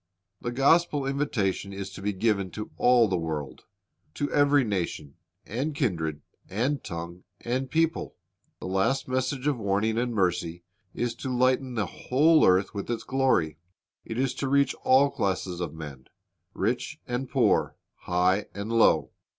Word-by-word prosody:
The - - -3
gospel 145 +3 +3
invitation 125 -9 -1
is 100 0 -6
to 95 - -9
be 105 +1 0
given 100 -1 0
to 105 - -6
all 125 -2 +5
the 95 -3 0
world, 75 -5 -5 0.2
— 75 - -44
"to 145 - -2
every 145 -1 +4
nation, 85 - -3 0.3
and 140 +8 -3
kindred, 80 - -1 0.3
and 125 +8 -1
tongue, 85 -1 -7 0.2
and 130 +2 -2
people."^ 165 0 0 0.5
The - - -8
last 95 +9 0
message 130 +1 -1
of 145 -4 +1
warning 105 +2 0
and 120 0 -1
mercy 90 -4 -1 0.3
is 120 -1 -1
to 130 - -5
lighten 130 0 +1
the 110 -3 0
whole 150 - +3
earth 95 +1 +3
with 100 +1 -5
its 120 -1 -2
glory. 130 - +1 0.4
It 115 - -6
is 135 0 +1
to 140 - -1
reach 140 0 +3
all 135 +2 +5
classes 95 -4 -2
of 85 - -3
men, 70 -5 -9 0.5
rich 120 +9 -2
and 125 +1 -3
poor, - - +2 0.2
high 90 +3 +1
and 100 +2 -4
low. 115 - +4
115 Hz, 160 wpm, -27 LUFS, 95-135 Hz, 0.5 s, all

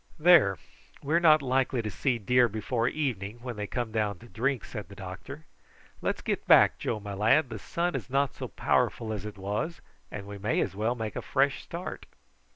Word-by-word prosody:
"There, 155 - +6 0.5
we 145 +3 -2
are 170 - +5
not 155 -3 +6
likely 130 -2 +1
to 105 - -3
see 125 +5 0
deer 125 +3 +3
before 115 +3 -1
evening 120 -8 -2
when 125 -2 -5
they 105 -1 -4
come 120 -1 -3
down 105 -3 -1
to 120 - -15
drink," 125 +2 -1
said - - -7
the - - -11
doctor. - - -8 0.6
"Let's - - -2
get - - -2
back, - - +6
Joe, 110 - -2
my 100 -1 -6
lad, 115 +8 +3
the 110 - -5
sun 170 - -2
is - - -4
not 140 0 +1
so - - -6
powerful 110 -2 0
as 105 -1 -5
it 105 - -9
was, 105 - -3 0.3
and 100 -1 -7
we 100 0 -8
may 105 +3 0
as 95 - -1
well 110 +4 0
make 110 -3 -4
a - - -3
fresh 140 -1 +1
start." 170 +2 -7
120 Hz, 205 wpm, -28 LUFS, 105-140 Hz, 0.6 s, There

